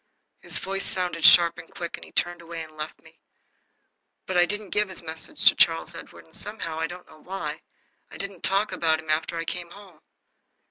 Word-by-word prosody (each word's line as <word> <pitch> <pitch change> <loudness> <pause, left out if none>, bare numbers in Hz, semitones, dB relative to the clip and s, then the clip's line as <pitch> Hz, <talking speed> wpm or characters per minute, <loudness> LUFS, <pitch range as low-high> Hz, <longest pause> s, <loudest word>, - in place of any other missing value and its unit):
His - - -1
voice 195 0 -2
sounded 180 -3 -2
sharp 170 0 +8
and 165 - -11
quick, 170 -1 -5
and - - -12
he - - -14
turned 175 0 0
away 165 -1 -6
and 155 -1 -13
left 155 0 -6
me. - - -19 1.1
But 185 - -3
I 175 0 +6
didn't 205 0 -4
give 210 -1 +2
his 185 - -1
message 160 0 -2
to - - +10
Charles 165 0 +3
Edward, 165 - -10
and 160 - -20
somehow, 165 -7 -3
I 165 - 0
don't 175 +1 -9
know - - -16
why, 190 +4 -5 0.5
I - - -10
didn't 195 -2 -5
talk 200 +2 +2
about 160 -1 +2
him 160 -1 -3
after 160 +2 0
I 165 - -2
came 175 +1 -4
home. 185 -3 -14
170 Hz, 205 wpm, -26 LUFS, 165-190 Hz, 1.1 s, to